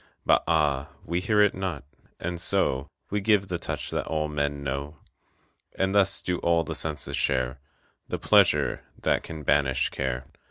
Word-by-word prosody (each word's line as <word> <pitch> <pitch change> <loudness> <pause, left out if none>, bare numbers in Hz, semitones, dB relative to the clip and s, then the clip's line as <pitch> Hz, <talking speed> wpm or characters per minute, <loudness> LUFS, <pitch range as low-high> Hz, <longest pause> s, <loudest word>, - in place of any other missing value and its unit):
But - - +4
ah, 75 -4 +1 0.2
we 85 +2 -1
hear 105 +3 +2
it 105 -1 +4
not, 90 -7 -4 0.4
and 85 0 -3
so 65 -4 +1 0.2
We 105 0 0
give 100 -1 +2
the 90 -2 -2
touch - - -4
that - - -2
all 80 -1 -1
men 70 -1 -2
know. 70 +2 -4 0.8
And 95 0 +1
thus 100 -2 +3
do 90 -1 -1
all 85 -1 +2
the - - -4
senses 75 -2 -2
share 65 +1 0 0.5
The - - -3
pleasure - - +3 0.2
that - - +2
can 80 -2 -8
banish 65 -1 +2
care. 65 -1 -2
80 Hz, 165 wpm, -26 LUFS, 70-90 Hz, 0.8 s, But